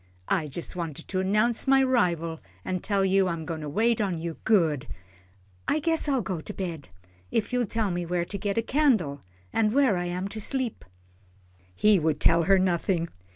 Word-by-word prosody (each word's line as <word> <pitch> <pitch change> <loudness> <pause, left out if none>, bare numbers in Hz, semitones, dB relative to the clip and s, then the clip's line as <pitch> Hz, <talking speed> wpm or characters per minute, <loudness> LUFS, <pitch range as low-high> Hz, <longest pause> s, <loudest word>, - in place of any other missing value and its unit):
I 155 - +1
jus' 165 +6 -5
wanted 165 -5 -5
to 185 0 0
'nounce 215 +6 +1
my 270 0 +5
'rival, 170 -10 +1 0.3
an' 185 - -1
tell 195 +1 0
you 190 0 +3
I'm 170 -2 -3
goin' 160 -2 -4
to 150 - -5
wait 225 +8 +2
on 190 -5 -1
you 165 0 -5
good 160 - +2 0.8
I - - +2
guess 325 -1 +1
I'll 265 -5 +1
go 185 -4 -3
to 210 - -8
bed, 170 - -5 0.4
if 225 - -1
you'll 245 -2 +1
tell 220 -2 0
me 175 -1 -3
where 175 0 0
to 200 - -5
get 200 0 -2
a 230 - +2
candle, 220 - +1 0.3
an' 220 -1 +3
where 265 -8 +3
I'm 175 +2 -2
to 215 +1 -6
sleep." 260 0 -2 0.9
He 210 - +4
would 155 -2 0
tell 165 0 +4
her 195 +2 +5
nothing. 175 -2 0
190 Hz, 190 wpm, -27 LUFS, 170-225 Hz, 0.9 s, my